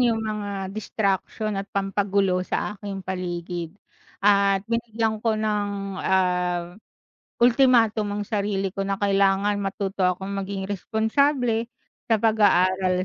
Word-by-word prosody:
'yung 230 Hz, -3 st, +2 dB
mga 200 Hz, -3 st, -4 dB
distraction 215 Hz, 0 st, -2 dB
at 200 Hz, -, -9 dB
pampagulo 195 Hz, -1 st, 0 dB
sa 185 Hz, -, -2 dB
aking 195 Hz, -2 st, -6 dB
paligid 175 Hz, -1 st, -4 dB, 0.5 s
at 200 Hz, -1 st, +4 dB
binigyan 225 Hz, -1 st, -1 dB
ko 220 Hz, -1 st, +1 dB
ng, 210 Hz, -1 st, 0 dB, 0.3 s
ah, 180 Hz, -2 st, 0 dB, 0.7 s
ultimatum 235 Hz, -4 st, +4 dB
ang -, -, -3 dB
sarili 200 Hz, -2 st, -1 dB
ko 195 Hz, -, -5 dB
na 195 Hz, 0 st, -1 dB
kailangan 200 Hz, 0 st, +2 dB
matuto 195 Hz, 0 st, -3 dB
akong 190 Hz, +2 st, -3 dB
maging 195 Hz, 0 st, -4 dB
responsable 230 Hz, +3 st, +1 dB, 0.4 s
sa 225 Hz, -, +4 dB
pag-aaral 185 Hz, -4 st, +3 dB
200 Hz, 115 wpm, -24 LUFS, 190-220 Hz, 0.7 s, at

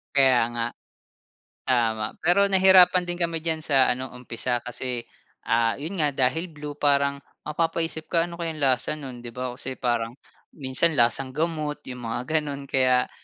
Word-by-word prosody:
Kaya 130 Hz, -3 st, +5 dB
nga. 115 Hz, 0 st, -1 dB, 1.0 s
Tama. 115 Hz, -4 st, +1 dB, 0.2 s
Pero 180 Hz, +5 st, +4 dB
nahirapan 185 Hz, -2 st, +6 dB
din 175 Hz, -, -2 dB
kami 170 Hz, -2 st, -1 dB
diyan 160 Hz, 0 st, 0 dB
sa 135 Hz, -3 st, +4 dB
ano, 130 Hz, +1 st, -3 dB
umpisa 125 Hz, 0 st, -3 dB
kasi, 120 Hz, 0 st, -4 dB, 0.4 s
ah, 115 Hz, 0 st, +2 dB
'yon 160 Hz, +7 st, -5 dB
nga 150 Hz, -3 st, +2 dB
dahil 135 Hz, +6 st, 0 dB
blue 150 Hz, -1 st, -8 dB
parang 140 Hz, -1 st, +2 dB, 0.3 s
mapapaisip 165 Hz, 0 st, -2 dB
ka, 165 Hz, -1 st, +2 dB
"Ano 170 Hz, -, -9 dB
kayang 165 Hz, -3 st, -4 dB
lasa 130 Hz, 0 st, +2 dB
no'n?" 130 Hz, -5 st, -8 dB
'Di 120 Hz, -, -8 dB
ba 125 Hz, +1 st, -3 dB
kasi 130 Hz, +1 st, -6 dB
parang 120 Hz, -2 st, -1 dB, 0.4 s
minsan 140 Hz, +4 st, +1 dB
lasang 130 Hz, +1 st, +1 dB
gamot 155 Hz, -1 st, -2 dB
'yong 125 Hz, -, -6 dB
mga 115 Hz, +1 st, -2 dB, 0.2 s
gano'n. 145 Hz, -2 st, -3 dB
Kaya, 130 Hz, -2 st, +2 dB
140 Hz, 160 wpm, -25 LUFS, 125-160 Hz, 1.0 s, nahirapan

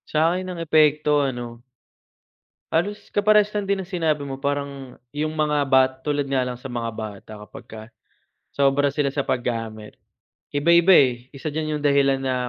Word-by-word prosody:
Sa'kin 170 Hz, +4 st, +1 dB
ang 180 Hz, -2 st, -6 dB
epekto 150 Hz, -2 st, +3 dB
ano 120 Hz, -3 st, -4 dB, 1.1 s
halos 205 Hz, +5 st, -2 dB
kaparehas 210 Hz, 0 st, +3 dB
lang 205 Hz, -2 st, -3 dB
din 195 Hz, -1 st, 0 dB
ng 185 Hz, +2 st, -16 dB
sinabi 155 Hz, -4 st, 0 dB
mo 135 Hz, -1 st, -6 dB
parang 140 Hz, -2 st, -4 dB, 0.2 s
'yung 155 Hz, +2 st, -3 dB
mga 150 Hz, -2 st, 0 dB
bat 130 Hz, 0 st, +4 dB, 0.2 s
tulad 145 Hz, -1 st, +1 dB
nga 135 Hz, -1 st, -1 dB
lang 125 Hz, -, -4 dB
sa 125 Hz, +1 st, -9 dB
mga 120 Hz, -1 st, -3 dB
bata 110 Hz, -1 st, -8 dB
kapagka 110 Hz, +1 st, -11 dB, 0.7 s
sobra 140 Hz, 0 st, +2 dB
sila 145 Hz, -2 st, 0 dB
sa 140 Hz, 0 st, -3 dB
paggamit. 115 Hz, -3 st, -4 dB, 0.6 s
Iba-iba 170 Hz, +5 st, +5 dB
eh, 125 Hz, -5 st, +3 dB
isa 140 Hz, +3 st, -5 dB
diyan 155 Hz, 0 st, -3 dB
'yung -, -, -9 dB
dahilan 140 Hz, -1 st, +3 dB
na, 130 Hz, -1 st, -1 dB
145 Hz, 160 wpm, -23 LUFS, 130-160 Hz, 1.1 s, Iba-iba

